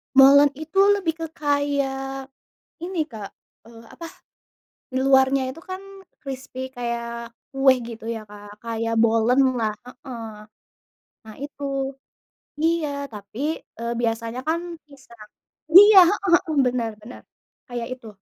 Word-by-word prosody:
Molen 280 +2 +8
itu 315 +6 -3 0.2
lebih 345 -5 -1
ke 330 - -3
kayak 275 -2 -2 0.5
ini, 345 -3 -2
Kak, 215 -6 -8 0.3
eee, 230 0 -15
apa, 335 - -10 0.8
di 260 - -6
luarnya 265 -1 +3
itu 330 - -13
kan 375 +2 -8 0.4
krispi 260 -1 -7
kayak 235 -1 -5 0.2
kue 270 -1 +5
gitu 230 -1 -9
ya, 225 -2 -4
Kak. 205 0 -13
Kayak 230 0 -2
bolenlah, 230 0 +2
heeh, 250 -1 -9 1.0
nah 220 -1 -12
itu. 285 +1 -8 1.0
Iya 305 -3 0
tapi, 210 +2 -10 0.4
eee, 235 0 -2
biasanya 230 +1 -2
kan 325 +1 +1 0.3
pisang 235 -6 -16 0.4
iya, 400 +3 +10
heeh 395 +1 -1
heeh, 315 - -4
benar 245 -2 -1
benar 235 +4 -11 0.5
kayak 240 -2 -5
itu. 250 -3 -14
260 Hz, 120 wpm, -23 LUFS, 230-285 Hz, 1.0 s, iya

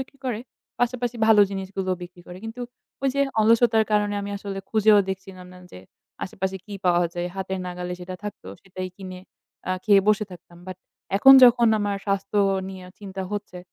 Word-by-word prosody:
বিক্রি 265 +1 -9
করে 230 -4 -2 0.4
পাশাপাশি 245 0 -1
ভালো 220 -2 +6
জিনিসগুলোও 190 -1 -3
বিক্রি 175 0 -11
করে। 180 +1 -10
কিন্তু 225 +2 -7 0.4
ওই 275 - +2
যে 280 - +1 0.2
অলসতার 225 0 +4
কারণে 205 -1 +1
আমি 200 - -5
আসলে 200 -1 -6
খুঁজেও 215 -1 +5
দেখছিলাম 190 -1 -7
না 180 - -13
যে, - - -10 0.5
আশেপাশে 190 0 -4
কি 210 - -11
পাওয়া 175 0 +3
যায়। 175 0 -3
হাতের 190 0 -4
নাগালে 180 0 -5
যেটা 180 +1 -7
থাকত 210 - -7 0.2
সেটাই 185 -1 -6
কিনে 185 -2 -8 0.5
আ - - +2
খেয়ে 205 -2 +6
বসে 215 0 +3
থাকতাম। 175 0 -14
But 185 - -6 0.4
এখন 270 +7 +8
যখন 240 -1 +6
আমার 205 -1 -1
স্বাস্থ্য 200 +1 -1 0.3
নিয়ে 190 -1 -9
চিন্তা 195 -2 -6
হচ্ছে 205 -3 -5
195 Hz, 175 wpm, -24 LUFS, 185-215 Hz, 0.5 s, এখন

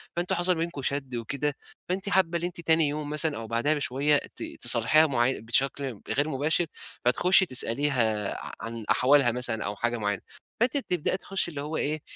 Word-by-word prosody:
فأنتم 175 +1 -1
حصل 175 +1 +2
بينكم 165 -3 -4
شَد 135 -2 -2
وكده، 140 +5 -2 0.3
فأنتِ 195 +2 -2
حابّة 175 -3 +2
إن - - -6
أنتِ 175 -1 -4
تاني 160 -2 +4
يوم 150 0 -4
مثلًا 150 -1 +1
أو 115 - -7
بعدها 120 +7 +1
بشوية 145 0 +2 0.2
ت - - -6 0.2
تصالحيها 155 +8 +4
معي 130 -1 0
بشكل 130 +1 -1
غير 145 +3 0
مباشر، 155 +5 +1 0.4
فتخُشي 180 +10 +4
تسأليها 120 - +1 0.3
عن 115 -1 -6
أحوالها 135 -2 +4
مثلًا 120 -2 -2
أو 105 - -3
حاجة 120 +3 -1
معيّنة، 105 -3 -2 0.4
فأنتِ 250 +4 +2
تبدأي 180 - 0
تخُشّي 195 -2 -2
اللي 140 - -5
هو 150 +2 -4
إيه، 150 +1 -1
145 Hz, 175 wpm, -27 LUFS, 120-165 Hz, 0.4 s, تاني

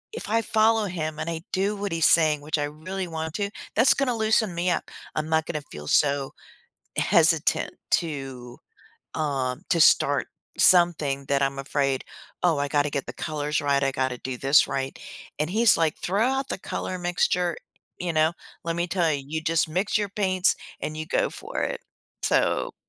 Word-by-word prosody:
if - - -6
I 225 +1 +2
follow 220 0 +3
him, 155 -5 -4
and - - -3
I 165 -1 -4
do 200 +3 +1
what 200 -1 -4
he's 165 -1 +3
saying, 155 -3 +4
which 150 +2 -2
I 145 - 0
really 180 +6 -5
want 160 -1 -5
to, 200 -1 -1 0.3
that's 255 - +6
gonna 255 -4 0
loosen 220 -3 +2
me 175 +2 0
up. - - -2 0.2
I'm 155 0 -1
not 160 -1 +2
gonna 155 -3 -4
feel 75 0 -8
so, 140 -2 +2 0.6
eh - - +2
hesitant - - +3 0.2
to, 135 -6 -2 0.6
um, 140 -3 -2
to 170 - +3
start 145 -3 +4 0.3
something 155 -6 +4
that 140 0 +1
I'm 135 0 -1
afraid, 135 -1 -1 0.4
"Oh, 170 -4 +3
I 145 - 0
gotta 145 0 +1
get 140 - -2
the - - -6
colors 150 -1 -2
right. 140 -1 +1
I 135 - +1
gotta 130 -1 -1
do 130 -1 -5
this 135 +3 +5
right." 135 0 -3 0.4
And 155 +1 0
he's 225 +1 +4
like, 160 -2 +1
"Throw 200 +5 +1
out 270 +1 -1
the - - -2
color 185 - -4
mixture" 175 0 0 0.4
you 175 -1 -2
know? 155 +1 +3 0.3
"Let 165 0 -2
me 175 +1 -1
tell 170 -2 +1
you. 140 -1 -4
You 160 +2 -3
just 165 0 +1
mix 185 +6 0
your 205 -2 -2
paints 185 -2 +1 0.3
and 155 - -4
you 155 - -4
go - - +1
for - - -5
it." - - -3 0.4
So - - +1
160 Hz, 190 wpm, -25 LUFS, 145-185 Hz, 0.6 s, that's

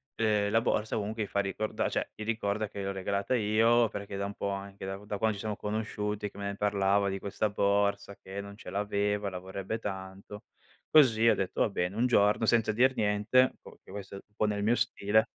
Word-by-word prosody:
ehm, 105 -2 +2
la 115 +1 +4
borsa 110 -1 0
comunque 110 +1 -2
gli - - -5
fa 100 - 0
ricorda 100 +2 -2
cioè, - - -2
gli 110 - -6
ricorda 110 -1 -1
che 100 - -8
gliel'ho 100 0 -2
regalata 100 +4 -1
io, 115 +1 +3
perché 100 0 -7
è - - -3
da 100 - -2
un 100 0 -6
po' 100 - -2
anche 100 0 -6
da 95 0 -3
da 105 0 -4
quando 110 +1 +1
ci 100 - -7
sono 105 -2 -3
conosciuti 105 -1 -3
che - - -16
me 100 - -5
ne 100 0 -3
parlava 100 -1 +2
di 95 0 -3
questa 100 +2 -1
borsa 100 0 +1
che 95 +1 -6
non 100 0 -7
ce - - -10
l'aveva, 105 0 -1
la 90 -1 -6
vorrebbe 95 +4 -5
tanto. 95 0 -7 0.5
Così 115 -7 +6
ho - - +6
detto: 95 -1 -3
"Va - - +3
bene," 90 0 -2
un 120 +2 +3
giorno 105 -2 +3
senza 110 -1 +3
dir 130 +4 +3
niente, 105 +5 +3
boh - - -12
perché - - -17
questo, 100 -1 -7
un 105 +1 -13
po' - - +1
nel 105 -1 -1
mio 115 +3 +3
stile. 110 -2 +2
105 Hz, 225 wpm, -30 LUFS, 100-110 Hz, 0.5 s, Così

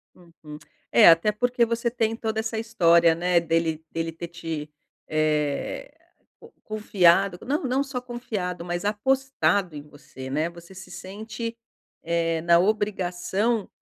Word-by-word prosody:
Uhum. 165 -4 -13 0.3
É, - - +8
até 170 +6 +5
porque 245 +2 +1
você 235 +1 -1
tem 225 -2 0
toda 220 -1 -3
essa 220 0 -2
história, 170 -7 +4
né, 175 0 +2
dele 165 -1 -1
dele 165 0 -3
ter 170 +1 -7
te, 165 -3 -6 0.4
eh, 155 - -1 0.5
co - - -16
confiado, 195 -3 +2
não 290 +4 -1
não 260 +2 +1
só 270 -2 -4
confiado, 210 -8 -5
mas 175 +1 -3
apostado 210 - +1
em 145 - -7
você, 140 -3 -11
né? 155 +4 0
Você 170 +1 -14
se 190 0 -11
sente, 220 +4 -6 0.5
eh, 165 -1 0
na 170 0 +5
obrigação 200 +1 0
180 Hz, 140 wpm, -25 LUFS, 165-225 Hz, 0.5 s, É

